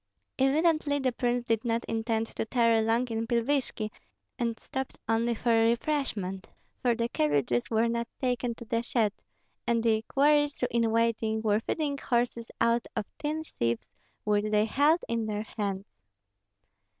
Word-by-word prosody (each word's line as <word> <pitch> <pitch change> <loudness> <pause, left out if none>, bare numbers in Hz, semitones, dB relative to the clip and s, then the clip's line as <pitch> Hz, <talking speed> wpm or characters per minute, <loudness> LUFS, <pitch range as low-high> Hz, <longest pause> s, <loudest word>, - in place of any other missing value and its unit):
Evidently 300 +2 +3
the 265 -2 +1
prince 245 0 -1
did 225 -2 +1
not 230 -1 -1
intend 225 0 -1
to - - -4
tarry 230 0 +3
long 230 +3 +1
in 225 0 -2
Pilvishki, 235 -2 0 0.5
and 235 - +1
had 225 -1 -7
stopped 265 +3 -5
only 230 +1 +1
for 235 +2 0
refreshment, 225 -4 0 0.3
for 240 -2 +2
the 230 0 0
carriages 145 - +1
were 225 +1 +2
not 235 0 -1
taken 245 -2 -1
to 235 - -10
the 230 +1 0
shed; 230 -3 +1 0.5
and 230 -1 +2
the 220 -1 +3
equerries, 290 +3 +2
in 230 -1 +2
waiting, 225 -1 +1
were 210 -1 +3
feeding 285 +4 -2
horses 235 -2 -1
out 235 0 +2
of 220 - -1
tin 310 +1 -2
sieves 115 - -2 0.4
which 210 0 +1
they 210 0 +3
held 290 +9 +3
in 230 -1 -1
their 210 0 -2
hands. 200 -2 -3
230 Hz, 155 wpm, -29 LUFS, 220-250 Hz, 0.5 s, Evidently